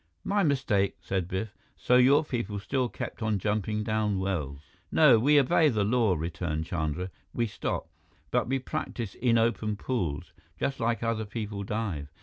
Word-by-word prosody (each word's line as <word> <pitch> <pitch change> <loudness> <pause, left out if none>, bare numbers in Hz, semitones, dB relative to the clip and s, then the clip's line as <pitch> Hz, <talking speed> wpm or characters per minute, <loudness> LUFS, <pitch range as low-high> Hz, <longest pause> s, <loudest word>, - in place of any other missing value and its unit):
"My 205 0 +1
mistake," 130 - +1
said 95 -3 -2
Biff. 100 +4 -4 0.2
"So 125 - +3
your 140 +5 +6
people 110 -7 -3
still 125 +5 -1
kept - - -6
on 110 -2 +1
jumping 105 +2 -1
down 110 -2 0
wells?" 80 -8 -2 0.3
"No, 135 -8 +6
we 145 +5 +5
obey 150 +3 +4
the 110 -6 +1
law," 110 -2 +2
returned 80 -1 -3
Chandra. 85 +2 -2 0.2
"We 120 - +1
stop. 105 - -3 0.4
But - - +1
we 135 +2 +1
practice 125 -6 -4
in 115 -2 +2
open 115 -2 +1
pools, 90 - -3 0.3
just 135 -1 -1
like 115 0 0
other 115 -1 -1
people 105 -2 -5
dive. 100 -9 -3
110 Hz, 160 wpm, -28 LUFS, 95-125 Hz, 0.4 s, your